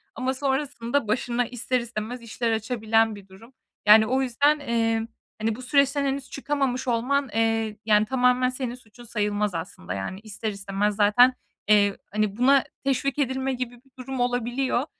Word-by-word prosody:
ama 260 0 -1
sonrasında 265 -3 -1
başına 240 +2 0
ister 250 +2 -1
istemez 235 +1 -5
işler 230 0 -2
açabilen 225 -1 +1
bir 200 -1 -13
durum. 210 +7 -16 0.3
Yani, 220 +1 +8
o 260 +3 +1
yüzden, 285 +4 +2
emm, 225 -4 0 0.3
hani, 220 0 -1
bu 255 - -9
süreçten 280 +2 +2
henüz 270 -1 -2
çıkamamış 270 -2 -2
olman, 255 +4 +1
eee, 225 -1 0
yani, 210 -1 +4
tamamen 250 0 +2
senin 255 -2 -4
suçun 240 -1 -16
sayılmaz 210 -4 -1
aslında. 125 - -6
Yani, 100 - -5
ister 215 0 -5
istemez 200 +1 -2
zaten, 220 +5 +5 0.3
eee, 205 -1 +4
hani, 210 -1 -1
buna 270 +2 +5 0.2
teşvik 275 +1 0
edilme 265 0 0
gibi 250 -1 -4
bir 255 +2 -24
durum 260 0 -6
olabiliyor. 245 +2 0
240 Hz, 155 wpm, -25 LUFS, 215-260 Hz, 0.3 s, Yani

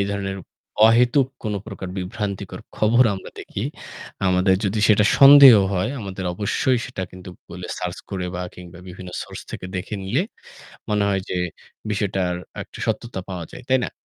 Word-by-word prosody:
ধরনের 100 -1 -3 0.5
অহেতুক 125 +4 +4 0.2
কোনো 105 -2 -2
প্রকার 100 -3 -7
বিভ্রান্তিকর 100 +1 -4 0.2
খবর 120 +4 +4
আমরা 95 - -9
দেখি। - - -5 0.6
আমাদের 95 +1 +3
যদি 100 +2 0
সেটা 105 -1 +5
সন্দেহ 140 -2 +10 0.2
হয়, 95 +7 0
আমাদের 95 -2 -6
অবশ্যই 120 +6 +1
সেটা 125 -7 -5
কিন্তু 95 0 -11
গুগলে 90 +1 -9
সার্চ 90 0 -4
করে 90 -2 -3
বা 90 - -3
কিংবা 90 -1 -12
বিভিন্ন 90 0 -9
সোর্স - - -9
থেকে - - -6
দেখে 90 +3 -4
নিলে 115 - 0 0.7
মনে 105 -1 +2
হয় 95 -1 0
যে - - -2 0.5
বিষয়টার 95 -3 -1 0.3
একটা - - -11
সত্যতা 120 -5 -2
পাওয়া 90 -3 -5
যায়। - - -9
তাই 130 0 +4
না? - - -5
100 Hz, 160 wpm, -22 LUFS, 90-115 Hz, 0.7 s, সন্দেহ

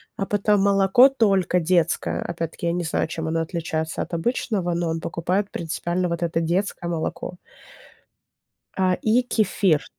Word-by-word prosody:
А 195 - -2
потом 205 0 +2
молоко 200 +6 +5
только 195 -8 +2
детское. 170 -1 +1
Опять-таки 170 0 -4
я - - +2
не 175 - -1
знаю, 160 -1 -1
чем 160 0 -4
оно 165 +1 0
отличается 160 -1 -3
от - - -6
обычного, 180 -1 -1
но 170 -1 -1
он 165 0 -2
покупает 180 +5 -1
принципиально 175 +2 -2
вот 170 0 -2
это 165 -1 0
детское 175 +1 -1
молоко. 170 +1 -4 1.4
А 185 -1 +2
и 225 +3 +3
кефир 200 - +1
175 Hz, 150 wpm, -23 LUFS, 165-195 Hz, 1.4 s, молоко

